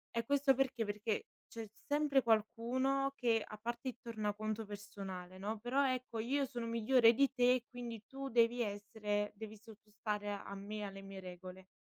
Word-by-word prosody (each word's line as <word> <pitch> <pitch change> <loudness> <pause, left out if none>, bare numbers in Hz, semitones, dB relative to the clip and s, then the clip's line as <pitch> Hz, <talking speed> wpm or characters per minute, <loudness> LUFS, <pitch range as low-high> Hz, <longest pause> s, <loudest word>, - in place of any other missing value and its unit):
E 230 - +1
questo 280 +1 +4
perché? 260 -3 +1
Perché 210 +1 -2 0.2
c'è 225 -1 -6 0.2
sempre 290 -2 +3
qualcuno 245 +5 +2
che, 230 -3 +2
a 215 - -8
parte 235 +4 -4
il 250 - -7
tornaconto 215 -1 -2
personale, 195 -3 -7
no: 210 +4 -2
"Però 255 +5 +2
ecco, 255 -3 -2
io 270 +6 +1
sono 245 -3 -3
migliore 230 +1 +5
di 275 +2 +4
te, 250 -1 +4
quindi 235 -3 -6
tu 275 0 -5
devi 235 0 +4
essere 205 0 -1
devi 220 +1 -7
sottostare 210 -1 -5
a 200 0 -6
me 205 +2 -5
e - - -3
alle 195 -1 -6
mie 195 -1 -8
regole". 185 +1 -9
225 Hz, 170 wpm, -37 LUFS, 205-250 Hz, 0.2 s, migliore